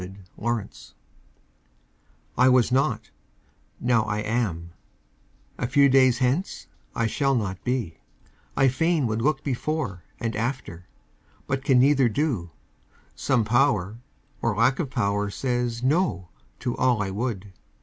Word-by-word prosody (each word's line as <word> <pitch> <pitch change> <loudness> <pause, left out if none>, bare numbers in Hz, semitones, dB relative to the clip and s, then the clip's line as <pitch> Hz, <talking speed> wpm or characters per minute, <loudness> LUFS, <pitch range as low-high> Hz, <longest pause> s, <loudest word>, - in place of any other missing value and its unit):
THE 90 +1 -8 0.2
MYSTERY 115 -2 -4 1.4
I 130 +1 +5
was 125 -1 +4
not; 125 -5 0 0.7
now 120 -2 +2
I 105 -1 -2
am 105 -7 -2 0.9
a 120 - -1
few 140 +2 +4
days 130 -2 +5
hence 130 - -1 0.3
I 115 - +1
shall 135 +4 +1
not 95 -5 -3
be; 120 -11 -2 0.6
I 135 - +5
fain 160 +3 +1
would 110 0 -1
look 150 +2 +1
before 135 - -2 0.2
And 115 -1 -3
after, 110 -7 -4 0.6
but 135 0 -2
can 135 -2 +4
neither 135 -1 +4
do; 115 - -1 0.6
some 120 -5 +1
Power 115 -4 +1 0.4
Or 115 -3 0
lack 120 +5 +2
of 155 -7 -2
power 105 -4 0
says 120 +1 -2
"no" 130 - +1 0.3
to 120 - -2
all 125 -5 +2
I 95 - -4
would. 105 -2 -4
120 Hz, 130 wpm, -25 LUFS, 105-135 Hz, 1.4 s, I